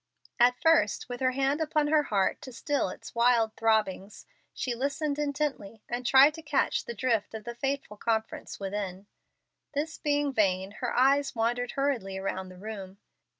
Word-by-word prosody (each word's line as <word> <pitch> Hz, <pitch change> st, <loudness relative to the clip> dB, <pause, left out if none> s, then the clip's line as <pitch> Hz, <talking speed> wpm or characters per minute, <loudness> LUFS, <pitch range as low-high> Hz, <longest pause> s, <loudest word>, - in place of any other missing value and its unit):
At 245 Hz, +1 st, +5 dB
first, 320 Hz, -11 st, +3 dB
with 245 Hz, 0 st, -5 dB
her 260 Hz, -1 st, +1 dB
hand 275 Hz, +3 st, +1 dB
upon 305 Hz, -1 st, +1 dB
her 305 Hz, 0 st, +5 dB
heart 205 Hz, -9 st, 0 dB
to 260 Hz, -, -9 dB
still 285 Hz, -, -1 dB
its -, -, -10 dB
wild 235 Hz, -2 st, +3 dB
throbbings, 215 Hz, -3 st, 0 dB, 0.3 s
she 250 Hz, -, -3 dB
listened 285 Hz, +4 st, -2 dB
intently, 280 Hz, -8 st, -3 dB
and 245 Hz, +1 st, -3 dB
tried 275 Hz, +4 st, +7 dB
to 320 Hz, -, -9 dB
catch 295 Hz, -3 st, 0 dB
the 235 Hz, -, -6 dB
drift 225 Hz, -2 st, 0 dB
of 220 Hz, -, -6 dB
the 235 Hz, -, -6 dB
fateful 270 Hz, -3 st, -3 dB
conference 220 Hz, 0 st, -2 dB
within. 195 Hz, -1 st, -4 dB, 0.7 s
This 310 Hz, +3 st, -2 dB
being 290 Hz, -2 st, 0 dB
vain, 190 Hz, -3 st, +1 dB
her 245 Hz, -, -1 dB
eyes 275 Hz, +2 st, +3 dB
wandered 240 Hz, +2 st, 0 dB
hurriedly 245 Hz, -9 st, -1 dB
around 190 Hz, -1 st, -3 dB
the 185 Hz, -, -12 dB
room. 195 Hz, -1 st, -8 dB
240 Hz, 165 wpm, -28 LUFS, 210-280 Hz, 0.7 s, tried